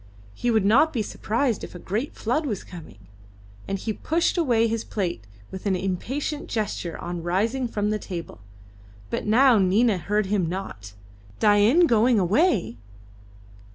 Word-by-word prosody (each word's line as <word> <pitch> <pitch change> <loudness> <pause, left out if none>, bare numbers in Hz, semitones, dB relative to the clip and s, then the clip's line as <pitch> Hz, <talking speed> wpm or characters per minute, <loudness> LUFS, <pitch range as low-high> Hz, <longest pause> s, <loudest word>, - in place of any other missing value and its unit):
He 245 - -2
would 220 -4 +2
not 275 +10 +4
be 230 -5 -1
surprised 230 +3 -1
if - - -8
a - - -5
great 215 - -4
flood 270 +7 -1
was 210 -7 -3
coming. 165 - -11 0.7
And 195 - -2
he 215 +3 -3
pushed 330 +9 0
away 245 -10 +2
his 225 0 -2
plate 170 - -4 0.2
with 190 +2 -6
an 190 - +2
impatient 255 - -3
gesture 205 -6 -3
on 175 0 -5
rising 220 +9 0
from 210 -2 -1
the 215 - -1
table. 170 - -7 0.7
But - - -3
now 240 +1 +5
Nina 200 +2 +3
heard 210 +4 0
him 190 -3 0
not. 105 - -6 0.5
Dain 215 +11 +5
going 235 -3 +3
away! 200 - +2
210 Hz, 155 wpm, -24 LUFS, 185-240 Hz, 0.7 s, now